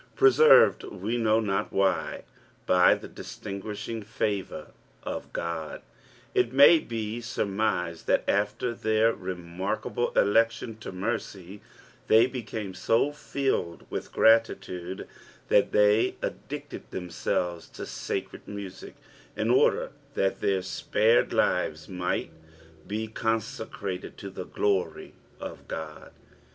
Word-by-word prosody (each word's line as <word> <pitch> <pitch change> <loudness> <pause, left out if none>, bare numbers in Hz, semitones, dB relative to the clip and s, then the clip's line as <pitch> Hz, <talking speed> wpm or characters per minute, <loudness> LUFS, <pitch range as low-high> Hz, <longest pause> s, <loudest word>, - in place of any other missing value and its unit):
Preserved, 435 +4 +6
we 100 +4 -4
know 110 -2 +3
not 100 -3 -1
uAi/, 95 -2 0 0.4
by 90 -1 +5
the - - -9
distingittshini/ 105 +2 -6
favour 105 -2 -3 0.3
<^ - - -3
(tod, 85 -2 -4 0.5
it 120 -1 +2
may 140 +5 +8
be 115 -2 -4
surmised 100 -6 -1
thai - - +3
after 105 +4 0
thar 110 0 +2
remarkdbl* 95 +5 -3
election 115 +2 +2
to 110 - -7
nurr^, 95 0 -4 0.5
they 110 +2 +6
became 110 -6 -5
tofilitd 135 -5 0
with - - -4
gmlitude 95 -5 +2 0.5
thai - - +7
they 105 +1 +4
addicted - - -6
thems^ves 85 +1 -3
to - - -7
sacred - - -5
music 100 -2 -8 0.4
tn - - +2
order - - +3 0.2
thai 95 - +3
their 95 -1 -1
spared 110 +5 +2
lives 75 0 +1
might 90 -1 -2 0.6
be 110 +2 -3
consecrated 110 -4 -3
to 100 - -7
the 90 - -6
glory 100 -3 -1 0.3
of - - -8
Ooi. 80 -1 -7
105 Hz, 110 wpm, -27 LUFS, 95-115 Hz, 0.6 s, may